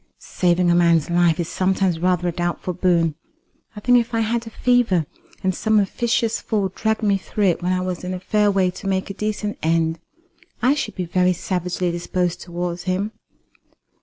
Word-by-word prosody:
"Saving 175 -1 +1
a - - +4
man's 170 -2 +3
life 170 -1 +3
is 170 - -1
sometimes 185 -2 0
rather 180 0 +1
a - - +1
doubtful 175 +1 -2
boon. 170 -3 +2 0.6
I - - -6
think 245 +2 +5
if 235 0 -3
I 225 - +2
had 230 +1 -1
a - - -5
fever, 225 -8 +2 0.4
and 185 0 +1
some 220 +3 +2
officious 230 +3 0
fool 205 -4 -1
dragged 220 +1 -1
me 200 -2 +2
through 210 +2 -3
it 180 -3 +2
when 180 +1 0
I 185 0 +1
was 185 -1 -4
in 180 - -4
a - - -5
fair 210 +3 +2
way 190 -2 +2
to 195 +2 -8
make 190 0 -1
a - - -5
decent 210 +1 -3
end, 165 0 +1 0.6
I 255 +3 +3
should 295 - -3
be 180 - -3
very 180 +1 +2
savagely 180 0 -2
disposed 175 0 -2
towards 175 0 -4
him." 190 +3 -1
185 Hz, 195 wpm, -21 LUFS, 175-210 Hz, 0.6 s, think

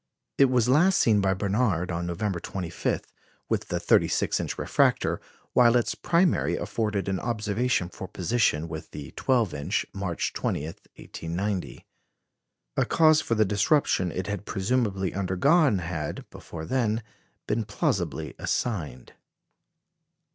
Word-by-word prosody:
It 140 - +8
was 125 -2 +2
last 165 +9 +4
seen 105 -3 +4
by 95 -1 +2
Barnard 95 -3 0
on 85 0 -2
November 90 +1 -2
25, 90 -1 -3 0.5
with - - -1
the - - -2
thirty - - +4
six - - 0
inch - - -3
refractor, - - +1 0.3
while 120 -1 +5
its 120 - +2
primary 170 0 +2
afforded 105 -4 -2
an 95 -1 -1
observation 110 -2 0
for 95 +1 -8
position 90 -5 0
with 80 0 -7
the 70 -3 -8
twelve 120 - +1
inch, 70 - -1
March 95 -4 -2
20, 75 - -2
1890. 90 +4 -5 0.9
A - - +3
cause 155 -1 +5
for 115 - -1
the 110 0 +3
disruption 100 - +2
it 95 +2 -3
had 100 +1 -4
presumably 95 -3 0
undergone 105 - +3
had, 85 -4 -4
before 80 -1 -8
then, 115 0 0 0.4
been 115 - 0
plausibly 80 -7 -2
assigned. 75 - -3
100 Hz, 135 wpm, -26 LUFS, 85-120 Hz, 0.9 s, It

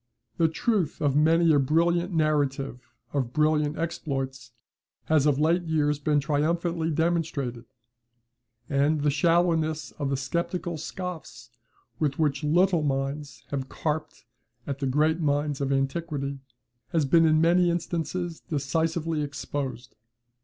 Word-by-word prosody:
The 165 - +4
truth 190 - 0
of 145 -3 +1
many 165 +2 +4
a 145 - +5
brilliant 170 +6 +2
narrative 145 -5 0 0.3
of 130 -4 -1
brilliant 150 0 +2
exploits 135 -6 -4 0.5
has 155 -2 +3
of 145 -2 +3
late 165 +4 +3
years 150 -2 +1
been 150 0 +2
triumphantly 160 +3 0
demonstrated; 155 -7 -1 1.0
and 145 +2 +2
the 145 0 +2
shallowness 160 0 +1
of 140 -2 -1
the 135 - 0
sceptical 170 +4 -3
scoffs 155 - -7 0.5
with 145 -3 0
which 145 -3 0
little 175 +3 +3
minds 140 +1 -3
have 135 -2 -3
carped 155 0 -4 0.4
at 140 -1 -4
the 135 - -1
great 155 +5 +2
minds 145 -2 0
of 140 0 0
antiquity, 140 0 -2 0.5
has 160 -3 +2
been 165 +4 +5
in 155 0 +4
many 175 +2 +4
instances 170 0 -2
decisively 160 +2 -1
exposed. 135 -3 -5
150 Hz, 125 wpm, -26 LUFS, 140-165 Hz, 1.0 s, a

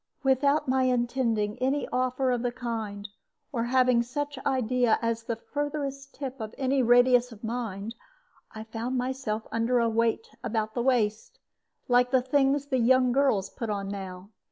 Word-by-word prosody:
Without 280 +3 +2
my 260 0 +2
intending 240 -3 0
any 270 +3 0
offer 255 +1 0
of 245 -1 0
the 245 0 -1
kind, 220 -4 -5 0.4
or 235 -3 -1
having 250 -1 +3
such 285 +3 -4
idea 250 -3 +2
at 230 -1 0
the 230 - -1
furthest 280 +2 -4
tip 270 -2 -6
of 220 -1 -6
any 265 0 +1
radius 245 +1 +5
of 225 -1 -13
mind, 225 -2 -4 0.6
I 220 - -7
found 230 +3 -4
myself 250 -4 -2
under 230 +2 +1
a 235 -1 +3
weight 230 - +1 0.2
about 220 -1 -2
the 240 - -1
waist, 225 -4 0 0.5
like 245 -1 +4
the 255 -1 +3
things 275 +1 +2
the 265 -3 0
young 255 +1 +4
girls 240 -7 +2
put 230 - -5
on 200 -1 -3
now. 190 0 -7
245 Hz, 160 wpm, -27 LUFS, 225-260 Hz, 0.6 s, radius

